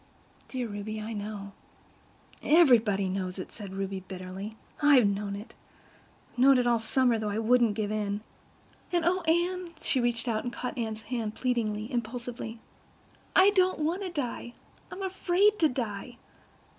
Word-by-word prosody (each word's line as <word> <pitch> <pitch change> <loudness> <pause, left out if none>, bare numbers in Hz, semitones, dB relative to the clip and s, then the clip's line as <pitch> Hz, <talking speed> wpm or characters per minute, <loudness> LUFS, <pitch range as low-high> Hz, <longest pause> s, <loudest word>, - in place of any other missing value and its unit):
"Dear 255 -2 -3
Ruby, 215 +1 -5
I 215 +2 -5
know." 205 -1 -5 0.9
"Everybody 235 - +5
knows 185 0 -3
it," 185 - -6
said 200 -3 -8
Ruby 195 0 -3
bitterly. 190 +3 -7 0.2
"I 290 -2 +7
know 200 -1 0
it—I've 200 +4 -12
known 270 +1 +7
it 250 - +2
all 240 -1 +3
summer, 235 +1 +2
though 215 -1 -2
I 205 - -2
wouldn't 230 -1 +3
give 210 -1 -2
in. 210 -1 -2 0.7
And, 345 -2 +1
oh, 365 +2 +2
Anne"—she 340 -3 0
reached 240 0 0
out 220 -2 0
and 245 - -3
caught 250 +1 -5
Anne's 220 -2 -3
hand 225 -3 -3
pleadingly, 225 -2 -1
impulsively—"I 240 - -2
don't 370 -2 +3
want 325 +5 -1
to 380 - -3
die. 250 -6 -4 0.4
I'm 390 - -6
afraid 385 +2 +2
to 315 - +5
die." 240 -2 -4
235 Hz, 145 wpm, -29 LUFS, 210-285 Hz, 0.9 s, I